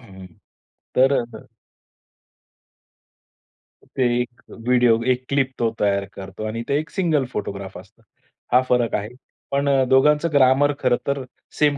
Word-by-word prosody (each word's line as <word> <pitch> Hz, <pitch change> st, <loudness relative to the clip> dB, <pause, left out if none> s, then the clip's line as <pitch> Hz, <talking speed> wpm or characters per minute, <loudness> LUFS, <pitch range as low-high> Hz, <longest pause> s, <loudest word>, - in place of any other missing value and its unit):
हं. 95 Hz, -5 st, -13 dB, 0.7 s
तर 135 Hz, +2 st, +4 dB
असं. 120 Hz, -2 st, -10 dB, 2.5 s
ते 130 Hz, -, +1 dB, 0.2 s
एक 120 Hz, 0 st, -8 dB
व्हिडिओ 120 Hz, -1 st, +2 dB
एक 125 Hz, +1 st, -8 dB
क्लिप 140 Hz, -2 st, +1 dB
तो 115 Hz, -, +2 dB
तयार 100 Hz, -1 st, +1 dB
करतो 95 Hz, +2 st, -8 dB
आणि 115 Hz, +2 st, -4 dB
ते 140 Hz, -, +1 dB
एक 155 Hz, +3 st, -6 dB
सिंगल 160 Hz, -8 st, 0 dB
फोटोग्राफ 100 Hz, -1 st, -5 dB
असतो. -, -, -16 dB, 0.5 s
हा 125 Hz, -, +6 dB
फरक 120 Hz, -2 st, +2 dB
आहे. 105 Hz, +2 st, -3 dB, 0.4 s
पण 140 Hz, +1 st, +1 dB
अ, 135 Hz, -1 st, +3 dB
दोघांचं 150 Hz, +5 st, +4 dB
ग्रामर 140 Hz, +1 st, +4 dB
खरं 125 Hz, -2 st, +2 dB
तर 140 Hz, -1 st, -1 dB, 0.4 s
सेम 145 Hz, -1 st, +3 dB
125 Hz, 140 wpm, -22 LUFS, 115-140 Hz, 2.5 s, हा